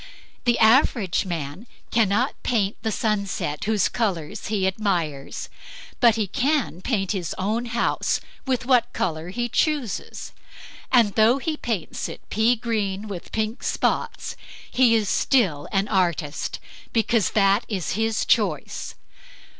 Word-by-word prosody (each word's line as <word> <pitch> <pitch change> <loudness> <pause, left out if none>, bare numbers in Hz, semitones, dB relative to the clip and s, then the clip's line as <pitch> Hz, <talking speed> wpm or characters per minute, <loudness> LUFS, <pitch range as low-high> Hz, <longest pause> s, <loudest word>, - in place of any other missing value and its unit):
The 240 -1 +3
average 220 - +4
man 165 - -5 0.2
cannot 225 +3 +2
paint 210 -4 0
the 220 - -1
sunset 200 -9 -1
whose 210 -3 +2
colors 200 -4 -2
be 205 -3 0
admires; 175 -8 -2 0.5
but 235 -3 +6
he 220 -2 0
can 270 - 0
paint 195 -4 0
his 180 -6 -3
own 215 +5 -1
house 235 0 0 0.3
with 255 -1 0
what 245 -2 +3
color 170 -6 -2
he 240 +5 -2
chooses, 265 - -1 0.6
and 230 -6 +4
though 225 +4 +5
he 310 +3 -2
paints 225 - -3
it - - -10
pea 225 +3 +3
green 215 -3 -2
with 190 -4 -7
pink 220 +2 -2
spots, - - -1 0.4
he 245 -3 +4
is 215 -2 +1
still 185 - +2
an 195 +1 +1
artist; 170 -7 -1 0.3
because 225 -1 +2
that 200 +2 +4
is 190 -6 -2
his 220 +2 0
choice. - - 0
215 Hz, 130 wpm, -24 LUFS, 190-235 Hz, 0.6 s, but